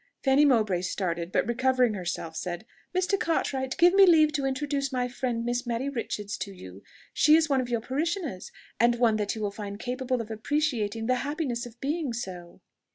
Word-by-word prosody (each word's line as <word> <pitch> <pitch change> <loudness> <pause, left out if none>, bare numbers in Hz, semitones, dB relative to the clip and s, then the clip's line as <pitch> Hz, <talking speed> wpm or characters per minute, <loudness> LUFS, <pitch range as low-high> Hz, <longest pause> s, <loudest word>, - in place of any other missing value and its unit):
Fanny 275 +2 +5
Mowbray 215 -9 +3
started, 180 -2 -2
but - - +2
recovering 250 -1 +2
herself, 175 -4 -4
said, 175 +4 -4 0.3
"Mr. 370 +2 +1
Cartwright, 265 -5 -1
give 350 +1 +6
me 390 -1 +7
leave 310 -3 +5
to 280 -2 0
introduce 275 0 -2
my 250 -1 0
friend 245 -2 -3
Miss 240 +1 -2
Mary 240 +4 -1
Richards 210 -5 -4
to 200 +2 -5
you. 95 - -11 0.3
She 300 +1 +6
is 320 -1 +3
one 270 -2 +3
of 245 - -5
your 235 -2 0
parishioners, 295 - -3 0.3
and 235 +1 +4
one 230 -2 +3
that 210 0 -1
you 220 - -4
will 205 - -1
find 200 -1 -6
capable 255 +1 -2
of 225 -1 -6
appreciating 225 -3 -1
the 255 +2 +2
happiness 275 -4 -3
of 240 0 -16
being 290 -1 -2
so." 180 -7 -7
245 Hz, 190 wpm, -27 LUFS, 210-280 Hz, 0.3 s, me